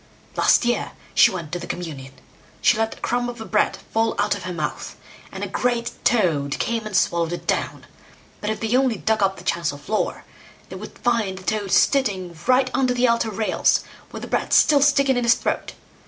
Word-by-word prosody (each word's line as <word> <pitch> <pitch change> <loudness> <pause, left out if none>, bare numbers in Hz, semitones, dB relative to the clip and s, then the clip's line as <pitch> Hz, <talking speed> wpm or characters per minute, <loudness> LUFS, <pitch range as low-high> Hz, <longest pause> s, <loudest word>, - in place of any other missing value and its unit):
Last - - +4
year 240 0 -1 0.2
she - - +6
went 170 -5 -6
to 175 - -3
the 175 - -8
communion. 145 -8 -6 0.5
She - - +4
let 225 0 -1
a - - -18
crumb 245 0 -1
of 240 - -7
the 225 - -7
bread 210 -1 +1 0.2
fall 225 0 +1
out 205 +1 +1
of 205 -3 -6
her 185 - -4
mouth, 155 -4 -4 0.4
and - - -6
a - - -2
great 240 -1 -1
toad 155 - +1
came 230 -2 -2
and 205 -3 0
swallowed 170 -2 +1
it 175 - -6
down; - - -2 0.5
but 210 - -3
if 220 - -2
they 225 +2 0
only 260 -3 +2
dug 220 +2 0
up 195 -1 +1
the - - -11
chancel 170 -4 -1
floor, 210 +10 -2 0.5
they - - -8
would - - -9
find 225 -6 0
the 185 - -10
toad 205 0 -2
sitting 195 -10 +2
right 255 0 +3
under 255 -2 +1
the 250 +1 +3
altar 235 -1 +1
rails, 215 +1 +1 0.3
with - - -8
the - - -5
bread - - -1
still 290 -2 +5
sticking 275 -2 +3
in 245 - 0
his 235 0 +5
throat. - - -3
220 Hz, 210 wpm, -22 LUFS, 180-245 Hz, 0.5 s, she